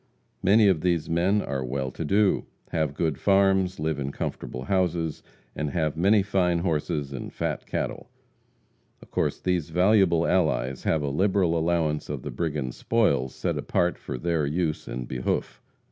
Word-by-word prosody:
Many 105 +3 +5
of 90 -6 +3
these 85 -3 +1
men 90 +5 +2
are 70 -2 -3
well 65 +1 -3
to 80 - -5
do; 100 +5 +2 0.2
have 80 -3 -1
good 80 -3 -1
farms, 95 -2 +3
live 80 -1 -1
in 70 0 -3
comfortable 65 -2 -5
houses, 85 -1 0 0.3
and 75 - -2
have 80 0 -1
many 100 +5 +4
fine 90 -3 +1
horses 75 -4 -1
and 65 - -6
fat - - -3
cattle. - - -3 0.9
Of - - -19
course - - 0
these 90 -4 -1
valuable 90 -1 +4
allies 70 -7 0
have 80 -2 +1
a 70 - -1
liberal 95 +2 +2
allowance 80 -2 0
of - - -4
the - - -5
brigands' 75 -7 -3
spoils 70 - +1
set - - -2
apart 90 0 0
for - - -5
their 85 +2 0
use 80 +2 -1
and 60 0 -5
behoof. 60 -1 -2
80 Hz, 160 wpm, -26 LUFS, 70-95 Hz, 0.9 s, Many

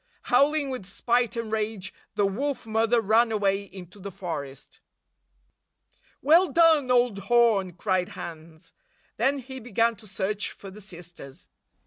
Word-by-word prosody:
Howling 285 +2 +3
with 250 -8 -6
spite 240 +4 0
and 230 -2 -4
rage, 215 -3 -2 0.2
the 205 -1 +2
Wolf 265 +9 -2
Mother 225 +2 +2
ran 225 +2 +3
away 200 -2 +1
into 190 -1 -12
the 200 +1 -6
forest. 160 -8 -7 1.4
"Well 335 +6 +5
done, 320 -5 +4
old 245 -4 +3
horn!" 225 -6 +3
cried 185 0 -1
Hans. 160 -1 -10 0.4
Then 270 +5 +2
he 265 0 -8
began 230 0 +1
to 215 +1 -14
search 200 +2 -2
for 195 - -11
the 210 +3 -12
sisters. 175 -6 -11
215 Hz, 135 wpm, -26 LUFS, 190-245 Hz, 1.4 s, Well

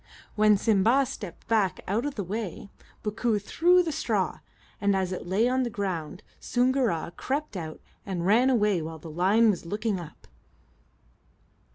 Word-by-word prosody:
When 210 -1 +4
Simba 225 +6 +3
stepped 210 -9 -8
back 200 -5 +1
out 220 +8 0
of 290 - -5
the 205 - -2
way, 200 0 -5 0.3
Bookoo 215 +1 0
threw 330 - +2
down 360 -1 +5
the 325 - -1
straw, 315 - -1 0.4
and 200 -1 +2
as 190 -1 -1
it 185 - -5
lay 205 +6 +2
on 255 +1 +1
the 245 - -1
ground 185 -4 -4 0.2
Soongoora 245 -10 0
crept 285 -3 -3
out 160 -4 -6 0.2
and 180 -3 -3
ran 230 +7 +4
away 210 -8 +2
while 160 +1 -6
the 160 +1 -10
lion 200 +7 +4
was 185 - -5
looking 210 +1 -1
up. 170 -3 -11
210 Hz, 165 wpm, -27 LUFS, 185-240 Hz, 0.4 s, down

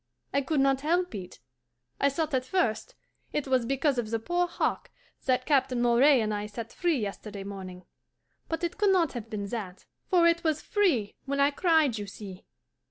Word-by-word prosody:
I 280 - +3
could 285 +2 0
not 270 0 +3
help 350 +3 +1
it. 185 -3 -8 0.6
I 280 - +4
thought 310 +2 -2
at 255 -1 +1
first 315 - -1 0.4
it 295 -2 -1
was 255 -3 +2
because 275 0 +1
of 220 -3 -3
the 225 - 0
poor 350 +10 0
hawk - - -2 0.4
that 255 -1 +1
Captain 265 -4 +2
Moray 245 +3 +5
and 215 -1 -1
I 205 0 -3
set 225 +2 -7
free 345 -4 +1
yesterday 205 -2 -5
morning; 185 -2 -8 0.6
but 325 +1 -3
it 345 +3 -3
could 410 -1 +4
not 355 -6 +3
have 230 -3 -6
been 210 -3 -4
that, 195 -5 -6 0.2
for 355 -3 +4
it 335 0 +3
was 315 -2 +1
FREE 305 - +1
when 280 +1 -2
I 280 +1 +4
cried, 310 - +2
you 205 - -5
see. 195 -2 -10
265 Hz, 190 wpm, -28 LUFS, 215-320 Hz, 0.6 s, Moray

